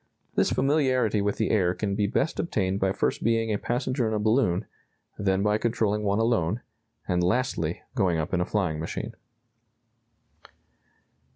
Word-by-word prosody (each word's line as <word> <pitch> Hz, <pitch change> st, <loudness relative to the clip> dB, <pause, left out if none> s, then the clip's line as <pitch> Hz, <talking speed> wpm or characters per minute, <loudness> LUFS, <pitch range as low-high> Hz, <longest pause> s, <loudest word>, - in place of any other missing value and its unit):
This -, -, +2 dB
familiarity 130 Hz, -6 st, +2 dB
with 100 Hz, 0 st, -1 dB
the 110 Hz, -, 0 dB
air 90 Hz, -4 st, +2 dB
can 100 Hz, -2 st, -2 dB
be 100 Hz, 0 st, +1 dB
best 155 Hz, -, -1 dB
obtained 95 Hz, -, 0 dB
by 95 Hz, -1 st, +2 dB
first 95 Hz, -, -1 dB
being 115 Hz, -1 st, +1 dB
a 100 Hz, -, -1 dB
passenger 125 Hz, 0 st, -1 dB
in 110 Hz, -, -1 dB
a -, -, 0 dB
balloon, 110 Hz, -4 st, +2 dB, 0.5 s
then 95 Hz, -1 st, +1 dB
by 105 Hz, +1 st, +2 dB
controlling 110 Hz, -3 st, 0 dB
one 100 Hz, -1 st, +1 dB
alone, 115 Hz, -2 st, +1 dB, 0.5 s
and 90 Hz, -1 st, +1 dB
lastly 90 Hz, -, 0 dB
going 95 Hz, -9 st, +1 dB
up 80 Hz, +2 st, -3 dB
in 90 Hz, -, +2 dB
a -, -, +1 dB
flying 90 Hz, -8 st, -1 dB
machine." 80 Hz, -, -4 dB
105 Hz, 160 wpm, -26 LUFS, 95-115 Hz, 0.5 s, This